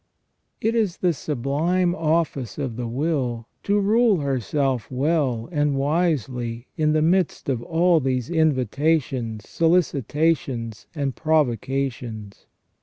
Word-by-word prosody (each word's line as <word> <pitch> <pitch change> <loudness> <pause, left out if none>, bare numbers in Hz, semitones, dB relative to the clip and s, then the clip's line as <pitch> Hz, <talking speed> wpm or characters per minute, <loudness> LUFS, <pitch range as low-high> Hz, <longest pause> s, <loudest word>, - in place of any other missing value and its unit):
It 225 - 0
is 215 -6 0
the 180 -2 +1
sublime 155 +6 0
office 160 - -1
of 135 -6 -3
the 120 0 -4
will 125 -3 -1 0.2
to 205 +1 +1
rule 215 +1 +3
herself 135 -1 -1
well 130 -3 0
and 145 -3 +1
wisely 135 -6 -1
in 155 -1 +2
the 155 0 +2
midst 180 +3 +1
of 125 -4 0
all 170 +4 +3
these 130 -3 -1
invitations, 135 -6 0
solicitations, 150 -7 0
and 140 -4 -2
provoca 140 -3 +1
tions. 110 -4 -10
145 Hz, 115 wpm, -23 LUFS, 125-165 Hz, 0.2 s, rule